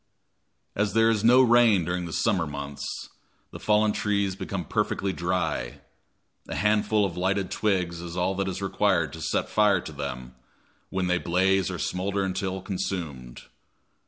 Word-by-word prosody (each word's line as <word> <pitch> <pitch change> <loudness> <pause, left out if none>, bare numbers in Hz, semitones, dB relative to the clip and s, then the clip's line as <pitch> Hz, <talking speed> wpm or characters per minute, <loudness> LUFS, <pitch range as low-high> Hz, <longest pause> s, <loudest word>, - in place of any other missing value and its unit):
As 105 0 0
there 115 +1 +4
is 110 -2 0
no 125 +3 +7
rain 115 -7 +5
during 90 0 -2
the - - -7
summer 85 0 +1
months, 70 -1 -6 0.7
the - - -9
fallen 105 0 +3
trees 100 -2 0
become 95 -2 -4
perfectly 95 +5 -1
dry; 85 -8 -2 0.7
a - - -5
handful 105 0 +2
of 90 -3 -5
lighted 95 +1 0
twigs 90 -5 0
is 85 0 -7
all 90 +2 +1
that 95 0 -1
is 95 +1 -4
required 95 - +1
to 80 - -8
set - - -1
fire 105 -3 +3
to 80 - -8
them, 65 -4 -6 0.6
when 95 -1 -1
they 90 0 +1
blaze 95 +2 +2
or - - -4
smoulder 100 +2 -1
until 95 0 -3
consumed. 90 - -4
95 Hz, 160 wpm, -26 LUFS, 85-100 Hz, 0.7 s, no